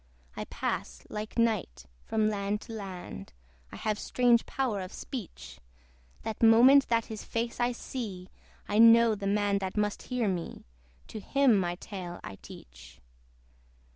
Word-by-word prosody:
I - - -5
pass, 60 0 -4
like 215 +2 -6
night, 215 - 0 0.2
from 215 -1 +1
land 205 0 -1
to 225 - -9
land; 185 - -8 0.4
I - - -9
have 215 -1 -2
strange 240 -2 +2
power 240 -7 -1
of 185 +1 -7
speech; 235 - -8 0.6
That 220 - -5
moment 245 +5 +7
that 230 -1 +1
his 220 -2 -7
face 235 +1 -3
I 240 0 +2
see, 210 -7 -6 0.4
I 210 - +1
know 230 0 +7
the 200 -1 -4
man 205 0 +1
that 190 +1 -5
must 210 -1 0
hear 250 -3 -2
me: 180 -4 -4 0.4
To 215 - -6
him 270 +3 +3
my 175 -3 0
tale 180 -2 -7
I 95 - -8
teach. 60 0 -14
210 Hz, 150 wpm, -29 LUFS, 190-230 Hz, 0.6 s, moment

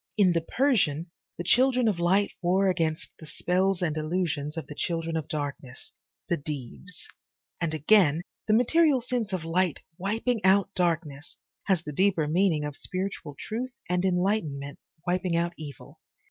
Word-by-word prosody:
In 190 -4 +5
the 165 - +1
Persian, 175 - +1 0.3
the 175 - -3
Children 250 +5 +4
of 200 -5 +1
Light 190 +4 +2
war 185 +2 +3
against 165 -3 -1
the 155 - -11
spells 185 +4 0
and 155 -3 0
illusions 155 -1 -2
of 160 - -4
the - - -8
Children 165 +1 -2
of 160 -2 -2
Darkness, 140 -4 -5 0.3
the 175 - +1
Deevs, 150 - -7 0.6
and 170 -2 0
again, 160 0 +4 0.2
the 215 - +3
material 290 +4 +4
sense 240 -4 -2
of 180 -4 -3
light 175 -1 +1 0.2
wiping 220 +4 -1
out 195 +1 +4
darkness, 165 -4 -1 0.3
has 185 -5 +2
the 150 - -6
deeper 180 -2 +2
meaning 165 -2 +2
of 150 -1 -5
spiritual 185 -6 -4
truth 245 +3 -4
and 180 0 0
enlightenment 180 -7 0 0.3
wiping 180 -1 0
out 170 +1 0
evil. 145 -4 -10
175 Hz, 155 wpm, -27 LUFS, 155-195 Hz, 0.6 s, In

